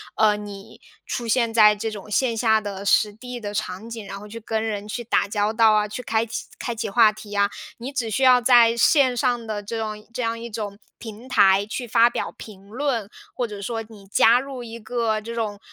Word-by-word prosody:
呃， 210 -1 +3
你 200 -1 -10 0.3
出 240 -2 -3
现 230 0 +2
在 210 -2 +6
这 220 +2 -3
种 210 0 -9
线 235 +1 +1
下 220 -1 +3
的 200 -2 -6
实 210 +1 +3
地 245 +2 -8
的 205 -2 -6
场 210 +1 -4
景， 225 -3 -7
然 195 0 -7
后 210 - -11
去 230 +2 -8
跟 220 0 -2
人 210 -2 -4
去 240 +3 -4
打 215 - +1
交 205 +1 0
道 225 -1 +5
啊， 210 0 +2
去 215 +4 -6
开 225 0 0
启 225 - -5
开 240 - -3
启 220 -1 -3
话 220 +1 +5
题 215 -1 -11
啊。 200 0 +2 0.3
你 250 +4 -6
只 240 -5 -2
需 265 - -1
要 255 -1 +7
在 235 -2 +6
线 260 0 +4
上 240 -1 0
的 210 -1 -3
这 225 +3 -5
种 215 -1 -5
这 250 - -3
样 230 -1 -2
一 235 0 -7
种 205 -2 -5 0.2
平 225 +2 -10
台 195 -5 +4
去 240 +3 -5
发 235 +2 +4
表 - - -3
评 195 -3 -12
论， 235 -2 -2 0.2
或 245 -2 -2
者 205 -2 -8
说 225 +3 -3
你 205 -3 -14
加 225 +4 +4
入 265 -2 -7
一 230 0 -8
个 225 -1 -1
这 230 +2 -7
种， 215 -3 -3
220 Hz, 245 characters per minute, -23 LUFS, 210-235 Hz, 0.3 s, 要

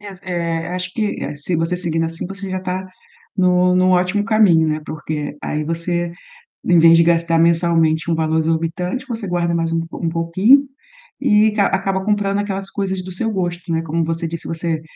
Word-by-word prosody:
Es 200 -3 -10
eh, 170 -3 -2
acho 180 0 -4
que, 210 0 -2
eh, - - -5
se 155 +4 -2
você 165 +2 -1
seguindo 165 -2 -1
assim 165 +1 -4
você 195 +1 -7
já 185 - -2
está 185 0 -4 0.5
no 180 -1 +3
no 185 0 +3
ótimo 180 +3 +2
caminho, 195 -7 +4
né, 155 0 -1
porque 150 -1 -5
aí 150 0 -2
você, 170 +1 -2 0.5
em 175 -2 +5
vez 165 0 +7
de 170 - +6
gastar 165 0 +2
mensalmente 165 -1 +2
um - - +2
valor 160 0 0
exorbitante, 165 +8 -2
você 225 -5 -5
guarda 175 -1 0
mais 165 -1 -1
um 165 0 -1
pou - - -9
um 165 - +1
pouquinho 185 +11 +4 0.6
e 215 -4 +4
ca 205 -2 +2
acaba 190 0 -1
comprando 205 -2 +1
aquelas 195 -1 -3
coisas 190 -2 -3
do 185 - -8
seu 225 +5 -2
gosto, 175 -3 -3
né. 165 0 +1
Como 165 +1 -1
você 165 +1 -2
disse, 165 0 -6
você 165 -1 -2
175 Hz, 195 wpm, -19 LUFS, 165-190 Hz, 0.6 s, vez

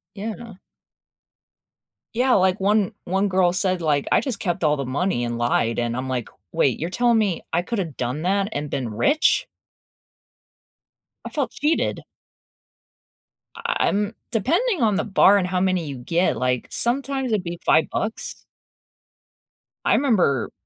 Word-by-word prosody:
Yeah. 220 +2 -6 1.6
Yeah, 250 +2 +2
like 185 +1 +3
one 205 +2 +2
one 190 +3 0
girl 185 -2 +3
said 185 -1 +1
like, 150 -3 +1
"I - - +4
just 260 -6 -2
kept 175 -2 -2
all 150 -1 +3
the 140 - -3
money 140 +1 -1
and 120 0 -3
lied," 120 -1 +1
and 120 0 -1
I'm 130 +1 -3
like, 125 -3 -3 0.2
"wait, 140 -7 +1
you're 165 - -2
telling 240 +3 +2
me 200 -6 0
I 170 - +2
coulda 195 0 -2
done 130 -1 -4
that 195 +2 +1
and 145 0 -3
been 125 -4 -3
rich?" 120 - +2 1.8
I - - -4
felt 285 -6 -2
cheated! 305 +3 0 1.5
I - - -2
I - - +2
I'm 205 +2 0 0.2
depending 335 - +1
on 215 -3 +3
the 200 - 0
bar 200 0 +5
and 185 -2 0
how 180 0 -1
many 185 -4 0
you 140 -3 -6
get, 170 +9 0
like 125 -1 -1
sometimes 265 +1 0
it'd 210 -4 0
be 170 0 -6
5 160 - +4
bucks. 220 +1 -3 1.4
I - - +3
remember 185 - +2
185 Hz, 155 wpm, -23 LUFS, 145-220 Hz, 1.8 s, bar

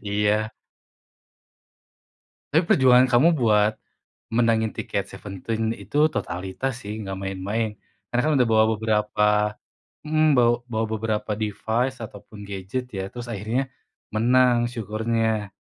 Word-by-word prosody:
Iya. 105 +1 +1 2.0
Tapi 165 +3 +2
perjuangan 130 -1 +5
kamu 130 +8 +5
buat 110 -6 +2 0.6
menangin 115 -2 +2
tiket - - -3
Seventeen 110 +3 -4
itu 130 +10 +1
totalitas 95 +9 -3
sih, 105 +2 -5
nggak 95 -2 -5
main-main. 100 +3 -2 0.4
Karena 120 - +2
kan - - +2
udah 125 - +4
bawa 110 0 +5
beberapa 105 -1 +1 0.8
mmm, 155 0 +3
bawa 120 0 +5 0.2
bawa 110 0 0
beberapa 110 -1 -2
device 110 +4 -2
ataupun 105 0 -12
gadget 100 +6 -4
ya, 95 0 -4
terus 120 0 -7
akhirnya 115 +5 -2 0.5
menang 120 +1 +3
syukurnya. 110 -2 -1
110 Hz, 115 wpm, -24 LUFS, 105-120 Hz, 2.0 s, perjuangan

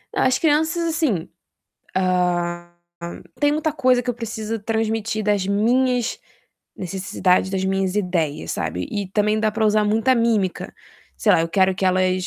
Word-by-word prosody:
É, - - +1
as 255 0 +3
crianças 320 +2 +2
assim, 315 - -1 0.7
hã, 175 -2 0 0.7
tem 290 0 +3
muita 310 0 0
coisa 255 -4 +2
que 250 - -9
eu - - -4
preciso 225 -1 -4
transmitir 220 0 -1
das 205 -2 +1
minhas 245 +4 +1 0.6
necessidades, 185 0 0
das 190 -1 -1
minhas 190 0 0
ideias, 165 - -1
sabe. 90 +1 -3
E 200 -3 -3
também 210 +2 +1
dá 215 - +2
para 220 +1 0
usar 215 0 +3
muita 225 +5 +2
mímica. 225 -6 0 0.4
Sei - - +2
lá, - - +4
eu 165 - -1
quero 190 +2 +2
que 190 - -3
elas 185 0 +1
210 Hz, 155 wpm, -21 LUFS, 185-235 Hz, 0.7 s, lá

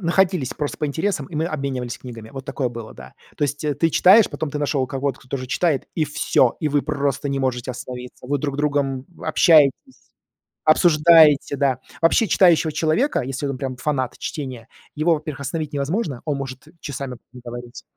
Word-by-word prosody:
находились 180 -5 +1
просто 145 -1 -3
по 150 - 0
интересам, 160 0 -2
и 155 - -12
мы 160 +2 0
обменивались 135 -6 -4
книгами. 115 -3 -10
Вот 135 -1 -8
такое 130 -2 -2
было, 115 -2 -8
да. 65 -1 -13 0.2
То - - -4
есть 145 +1 -3
ты 165 +1 +2
читаешь, 195 +7 +6
потом 155 - -4
ты 150 - -4
нашел 140 -2 0
кого-то, 135 0 -3
кто 130 - -20
тоже 130 -2 -4
читает, 150 +1 0
и 160 - +1
всё, 145 -4 +1
и 155 - 0
вы 145 -1 +1
просто 140 -1 -1
не 140 - -1
можете 130 -1 -1
остановиться. 125 0 -8
Вы 145 +2 0
друг 140 0 -3
другом 140 -3 0 0.2
общаетесь, 160 - +3 0.5
обсуждаете, 155 -3 +5
да. 130 -2 +1 0.2
Вообще, 180 +6 +3
читающего 170 -4 +4
человека, 165 - +1
если 135 +2 -4
он 135 -2 -3
прям 130 -2 -4
фанат 130 -2 -2
чтения, 130 -7 -6 0.3
его, 160 +3 +2
во-первых, 150 -2 -6
остановить 150 +2 -4
невозможно, 145 - -2
он 150 -3 -1
может 135 +1 -7
часами 135 -3 -5 0.2
проговорить. 120 0 -9
140 Hz, 175 wpm, -22 LUFS, 130-155 Hz, 0.5 s, читаешь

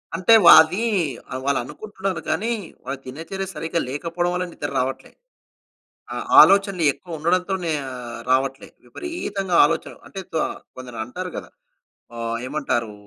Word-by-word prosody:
అంటే 185 +6 +4
వా - - +11
అదీ 185 +8 -3 0.5
ఆహ్, 130 - -3
వాళ్ళు 140 -1 +2
అనుకుంటున్నారు 190 - -5
కానీ, 230 +4 0 0.3
వాళ్ళ 135 +1 -4
దినచర్య 165 +9 -6
సరిగ్గా 165 +1 -2
లేకపోవడం 170 +5 -2
వల్ల 180 0 -1
నిద్ర 145 - -5
రావట్లే. 130 +1 -3 1.0
ఆ - - -5 0.3
ఆలోచనలు 195 -2 +4
ఎక్కువ 170 -3 -9
ఉండడంతోనే 180 +1 0 0.2
ఆహ్, 120 -2 -7
రావట్లే. 135 +1 0 0.2
విపరీతంగా 195 - -4
ఆలోచనలు. 165 +1 -3
అంటే 195 - -6
తొ 160 - +1 0.4
కొందరంటారు 125 +8 -6
కదా! - - -7 0.7
ఆహ్, 115 0 -3
ఏమంటారూ! 120 -7 -2
165 Hz, 130 wpm, -22 LUFS, 130-190 Hz, 1.0 s, వా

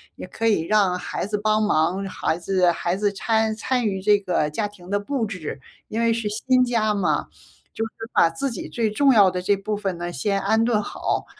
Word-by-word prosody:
也 - - -8
可 225 - -4
以 210 -7 +3
让 185 -1 +2
孩 - - -4
子 210 +1 -2
帮 215 +1 +2
忙， 185 0 +1
孩 170 -3 -2
子 180 0 +2
孩 175 +1 -1
子 205 0 0
摻 220 +2 0
参 245 -1 0
与 190 -1 -2
这 205 +1 +4
个 180 -6 -1
家 205 +7 -1
庭 195 -2 -14
的 205 - +1
布 245 +2 -2
置， 175 -9 -6 0.3
因 225 - -4
为 230 0 +3
是 225 -2 -2
新 255 +4 +2
家 225 -4 +1
嘛， 200 -3 0 0.5
就 225 - -3
是 225 - -8 0.2
把 165 - +5
自 250 +12 -3
己 - - -6
最 230 -2 0
重 275 +4 +4
要 200 -5 +6
的 180 0 -3
这 200 +2 +2
部 210 +2 -3
分 195 -4 -3
呢 175 0 -4
先 195 +8 0
安 220 +3 +2
顿 230 -3 +2
好。 - - -3
205 Hz, 235 characters per minute, -23 LUFS, 185-220 Hz, 0.5 s, 要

